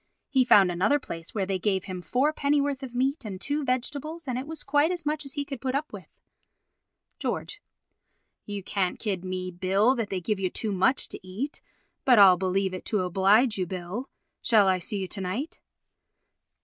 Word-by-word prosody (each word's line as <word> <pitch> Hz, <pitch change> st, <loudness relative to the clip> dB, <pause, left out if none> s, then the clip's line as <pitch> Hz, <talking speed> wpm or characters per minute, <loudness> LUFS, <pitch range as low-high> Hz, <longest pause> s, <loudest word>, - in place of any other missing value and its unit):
He 265 Hz, -2 st, +4 dB
found 200 Hz, -7 st, +6 dB
another 195 Hz, +12 st, +2 dB
place 165 Hz, -, -8 dB
where 200 Hz, -3 st, 0 dB
they 190 Hz, -1 st, -1 dB
gave 190 Hz, -1 st, 0 dB
him 185 Hz, -2 st, -6 dB
four 255 Hz, -, +1 dB
pennyworth 285 Hz, -1 st, +1 dB
of 255 Hz, -2 st, -8 dB
meat 270 Hz, +4 st, 0 dB
and 195 Hz, -4 st, -6 dB
two 290 Hz, +8 st, -1 dB
vegetables 285 Hz, +5 st, -3 dB
and 250 Hz, -1 st, -1 dB
it 265 Hz, -, -6 dB
was 320 Hz, 0 st, -5 dB
quite 290 Hz, +3 st, +3 dB
as 350 Hz, -3 st, -3 dB
much 300 Hz, 0 st, -1 dB
as 275 Hz, -, -6 dB
he 285 Hz, -2 st, -2 dB
could 275 Hz, -4 st, -7 dB
put 260 Hz, +1 st, -1 dB
up 300 Hz, +2 st, -2 dB
with. -, -, -9 dB, 1.1 s
George: 415 Hz, -, -3 dB, 0.9 s
You 205 Hz, -2 st, -4 dB
can't 185 Hz, -1 st, -1 dB
kid 195 Hz, -5 st, -3 dB
me, 185 Hz, 0 st, -4 dB
Bill, 190 Hz, +7 st, +2 dB
that 230 Hz, -5 st, -2 dB
they 190 Hz, -, -2 dB
give 200 Hz, +3 st, -2 dB
you 185 Hz, -1 st, 0 dB
too 215 Hz, +2 st, -3 dB
much 195 Hz, +8 st, +2 dB
to -, -, -6 dB
eat, 205 Hz, +11 st, -5 dB, 0.4 s
but 250 Hz, -3 st, +5 dB
I'll 195 Hz, -3 st, +9 dB
believe 190 Hz, +1 st, 0 dB
it 185 Hz, -, -6 dB
to 210 Hz, -3 st, 0 dB
oblige 195 Hz, +5 st, +3 dB
you, 180 Hz, -, -1 dB
Bill. 185 Hz, +8 st, -5 dB, 0.3 s
Shall 215 Hz, -4 st, +4 dB
I 185 Hz, -1 st, +3 dB
see 200 Hz, +4 st, -3 dB
you 190 Hz, -1 st, -3 dB
to 195 Hz, -, -4 dB
night? 210 Hz, -, -4 dB
210 Hz, 200 wpm, -27 LUFS, 185-275 Hz, 1.1 s, I'll